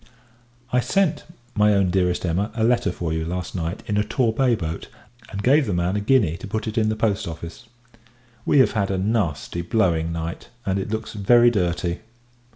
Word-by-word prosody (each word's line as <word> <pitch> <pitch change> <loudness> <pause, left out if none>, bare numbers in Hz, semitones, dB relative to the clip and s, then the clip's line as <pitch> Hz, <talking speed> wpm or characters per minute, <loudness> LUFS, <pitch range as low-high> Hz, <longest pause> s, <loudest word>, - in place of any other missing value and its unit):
I 125 - +4
sent, 175 +7 +1 0.3
my 105 -1 +4
own 95 -2 +2
Dearest 90 -1 +1
Emma, 90 +5 0
a 110 - 0
letter 120 -4 +2
for 85 -2 -3
you, 80 0 -1
last 90 +2 -4
night, 85 +2 -4
in 105 - -1
a 105 - +3
Torbay 120 +2 +1
boat, 80 -5 -5 0.4
and 100 +1 -5
gave 140 +1 +4
the 100 - 0
man 85 +2 0
a - - +1
guinea 105 -7 +2
to 100 - -8
put 110 +2 -3
it 110 - -4
in 110 -1 +2
the 110 - 0
Post 110 -4 0
Office. 85 +6 -8 0.8
We - - +2
have 130 - +5
had 100 -3 0
a 95 - 0
nasty 95 -5 -1
blowing 85 -3 +1
night, 85 0 -5 0.2
and 95 0 0
it 95 - -4
looks 110 0 -4
very 120 +4 +5
dirty. 85 -4 -1
100 Hz, 195 wpm, -23 LUFS, 85-110 Hz, 0.8 s, have